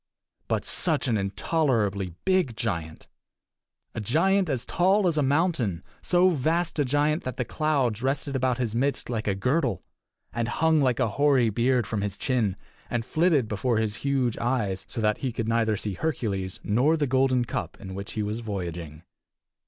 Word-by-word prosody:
But - - -1
such 155 -5 0
an 115 - +2
intolerably 100 - 0
big 185 -12 +2
giant! 85 -9 -4 0.9
A 110 - -4
giant 180 - +2
as 125 -3 -2
tall 190 +3 +2
as 170 - +2
a 150 - +2
mountain; 135 - +1 0.2
so 180 +1 +4
vast 165 +2 0
a 145 - +3
giant 145 +4 +1
that 130 -1 -5
the 125 - -1
clouds 135 -8 0
rested 135 +1 -1
about 130 -1 +1
his 120 -4 -2
midst 135 +1 -1
like 110 -3 -2
a 100 - +1
girdle, 125 - 0 0.5
and 115 0 -1
hung 160 +5 +2
like 125 -4 +2
a - - +3
hoary 130 0 +3
beard 120 +2 +2
from 105 +1 -2
his 100 -1 -3
chin, 115 -8 0 0.3
and 120 -2 -2
flitted 155 -5 +2
before 110 +3 0
his 105 -1 -1
huge 135 -4 0
eyes 110 -6 -1
so 115 - -4
that 105 0 +1
he 130 - -2
could 115 -1 -3
neither 115 -2 +1
see 105 -1 -3
Hercules 100 - -2
nor 130 +10 +2
the 150 - +1
golden 130 -1 +2
cup - - -4
in 95 -2 -8
which 100 +1 -6
he 110 - -2
was 105 +2 -3
voyaging. 85 -7 -5
120 Hz, 175 wpm, -26 LUFS, 105-145 Hz, 0.9 s, so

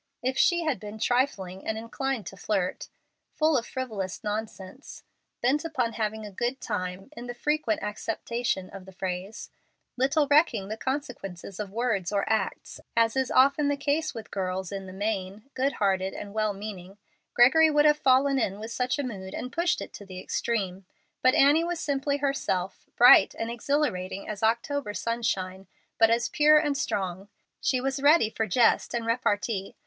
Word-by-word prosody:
If 260 +1 0
she 345 +4 +3
had 300 -9 -1
been 210 +1 -8
trifling 215 -6 0
and 220 - -1
inclined 230 0 -3
to 195 - -8
flirt, 190 -2 -2 0.5
full 310 0 +3
of 235 -3 0
frivolous 215 -7 -4
nonsense, 210 +2 -6 0.4
bent 280 +5 +2
upon 255 -8 -1
having 220 -1 -3
a 205 - -8
good 240 +7 -2
time 190 +1 -4
in 240 +1 -8
the 245 - -6
frequent 295 -4 0
acceptation 220 -1 -2
of 195 -1 -10
the 190 - -12
phrase, 190 +4 -5 0.4
little 275 +4 +2
recking 280 - +3
the 215 - -3
consequences 220 - -5
of 210 -2 -4
words 215 -4 -1
or 200 -1 0
acts, 220 -3 -2 0.2
as 230 0 +3
is 265 -1 +1
often 280 +3 +4
the 285 0 +1
case 290 +3 0
with 225 - -8
girls 185 -1 -3
in 195 -1 -5
the - - -8
main 200 0 -3
good 270 +2 0
hearted 190 -1 0
and 205 -1 -7
well 215 -1 +1
meaning, 195 -2 -8 0.4
Gregory 290 +7 +6
would 295 0 +3
have 300 0 +5
fallen 270 +1 +4
in 200 -4 -1
with 220 +2 -7
such 250 +2 -1
a 285 - -1
mood 195 -7 -6
and 250 - -6
pushed 345 +2 +1
it - - -8
to - - -9
the 185 -1 -8
extreme. 195 -2 -2 0.4
But 255 - +4
Annie 290 +4 +5
was 345 0 -2
simply 280 -1 -1
herself, 275 -10 -2
bright 245 - +7
and 225 +1 -3
exhilarating 235 -8 -1
as 210 -2 -5
the 220 - +3
October 235 0 -1
sunshine, 195 -5 -2 0.3
but 225 -1 +6
as 235 +1 +2
pure 305 +1 +5
and 295 -2 +1
strong. 195 -7 -3 0.3
She 255 - +1
was 270 +2 -2
ready 285 -6 +5
for 220 -1 -2
jest 235 +3 +3
and 235 -1 -2
repartee. 220 -4 -1
230 Hz, 175 wpm, -27 LUFS, 195-270 Hz, 0.5 s, bright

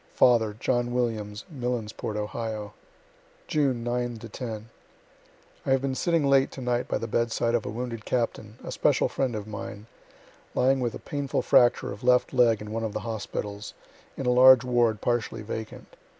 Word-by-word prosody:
Father, 110 -4 +4
John 120 -1 0
Williams, 110 -4 -2
Millensport, 120 -5 -3
Ohio. 105 0 -4 0.7
June 135 -6 0
9 120 0 -2
10. 110 0 -7 0.9
I - - -4
have 135 -1 +3
been 135 -1 0
sitting 165 +2 +1
late 135 -1 +4
to - - -8
night 125 0 0
by - - 0
the - - -4
bedside 115 +1 0
of 120 -2 0
a - - -2
wounded 115 0 -5
captain, 115 -2 -2
a - - -6
special - - +2
friend 130 -4 -1
of 105 -1 -4
mine, 110 0 -7 0.7
lying 130 +1 +3
with 120 -2 -1
a - - -4
painful 145 -3 -3
fracture 120 -1 +4
of 100 - -9
left 125 +2 +3
leg 120 -4 +4
in 105 0 -7
one 115 +1 -2
of 110 -2 -3
the 110 - -3
hospitals, 105 -2 -5 0.4
in 135 - -4
a 125 - +3
large 130 0 +8
ward 120 -4 +2
partially 115 -2 -1
vacant. 110 +1 -7
120 Hz, 170 wpm, -27 LUFS, 110-125 Hz, 0.9 s, large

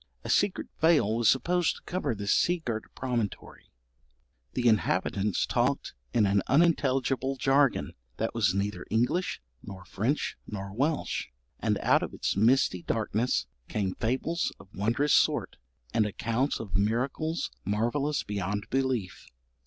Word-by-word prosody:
A - - -2
secret 205 -2 +2
veil 155 -10 +4
was 115 -2 +4
supposed 175 +5 +2
to - - -13
cover 180 -10 -2
this 100 0 0
sea 175 -1 +2
girt 110 -2 -2
promontory; 120 -6 -4 0.8
the 125 -1 +1
inhabitants 105 -2 +1
talked - - 0 0.2
in 105 - +3
an 100 0 +3
unintelligible 135 -3 +2
jargon 135 - +2 0.2
that 115 - -2
was 100 -5 +2
neither 100 +1 -2
English, 120 - 0 0.2
nor 95 -2 -10
French, 120 +12 -1
nor 100 -2 -6
Welsh; 145 - -1 0.3
and - - +1
out - - +4
of - - -5
its - - -1
misty 110 -3 +3
darkness 110 - 0 0.2
came 100 -3 -1
fables 130 +9 -1
of - - -15
wondrous 120 +9 +1
sort, - - +2 0.4
and 110 - +3
accounts 115 +6 -1
of 105 -4 -6
miracles 125 +10 0
marvellous 120 +9 0
beyond 100 +1 -3
belief. 130 -7 -1
115 Hz, 135 wpm, -28 LUFS, 105-135 Hz, 0.8 s, veil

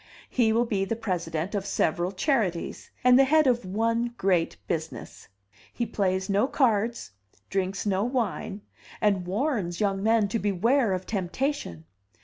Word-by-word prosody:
He 230 -3 +3
will 235 +2 +2
be 205 -4 0
the 210 +4 -2
president 175 -5 -3
of 200 -2 -1
several 175 -2 0
charities, 195 - -1
and 250 +1 +6
the - - +8
head 305 +3 +4
of 245 -2 +2
one 230 +4 0
great 180 -4 +1
business. 160 -7 -5 0.4
He 235 - -2
plays 190 -3 -1
no 205 +5 +2
cards, 230 - +1 0.4
drinks 190 0 -1
no 195 -1 +1
wine, 230 -4 -2 0.4
and 195 -4 +1
warns 200 - -1
young 195 -2 0
men 220 0 +3
to 230 - -1
beware 210 +4 +2
of 185 0 -3
temptation. 190 - -3
205 Hz, 145 wpm, -27 LUFS, 185-235 Hz, 0.4 s, the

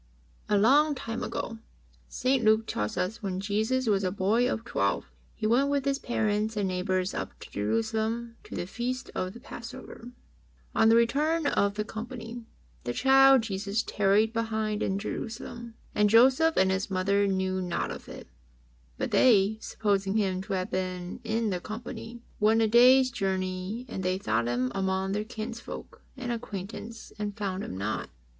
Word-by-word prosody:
A 210 - +4
long 285 +8 +5
time 230 -2 -5
ago, 225 -1 -4 0.5
St. 255 -1 +1
Luke 220 +1 +4
tells 105 - -3
US 190 +6 -2
when 190 -3 -3
Jesus 220 +6 0
was 200 -3 +2
a 185 - +1
boy 210 +6 +2
of 225 - -3
twelve, - - 0 0.3
He 220 - -4
went 250 +6 +3
with 280 -1 0
His 275 0 +1
parents 215 -2 -1
and 200 -2 +1
neighbours 185 +1 -1
up - - -5
to - - -11
Jerusalem 220 - -1
to - - -8
the - - -3
Feast 245 +6 -4
of 185 0 -3
the 235 - -11
Passover. 240 0 -9 0.6
On 225 0 +5
the 225 - +6
return 295 +8 +2
of 200 -7 +2
the 210 - -1
company, 230 +1 -7 0.4
the 120 - -2
child 270 - +6
Jesus 200 +1 -2
tarried 210 +2 +2
behind 220 -2 -1
in 195 - 0
Jerusalem. 230 +2 -6 0.2
"And 210 0 +3
Joseph 260 +8 +5
and 190 0 +4
His 190 +1 -1
mother 200 +1 +2
knew 190 -1 0
not 180 -1 -2
of - - -8
it. - - -9 0.7
But - - -2
they, 220 -3 +4
supposing 200 -1 0
Him 190 -3 0
to - - -3
have 185 +1 -2
been 185 0 -3
in 220 -1 0
the 180 - -1
company, 230 +3 -7 0.2
went 220 +2 +4
a - - +3
day's 255 +3 +6
journey; 190 +1 -2
and 195 - -5
they 185 0 0
sought 115 - 0
Him 125 +1 0
among 190 0 -1
their 210 +1 -1
kinsfolk 230 +1 -7 0.2
and 250 -2 -3
acquaintance 225 0 -6
and 205 -1 -3
found 195 -1 -2
Him 95 - -6
not." 100 -2 -3
215 Hz, 170 wpm, -28 LUFS, 190-235 Hz, 0.7 s, the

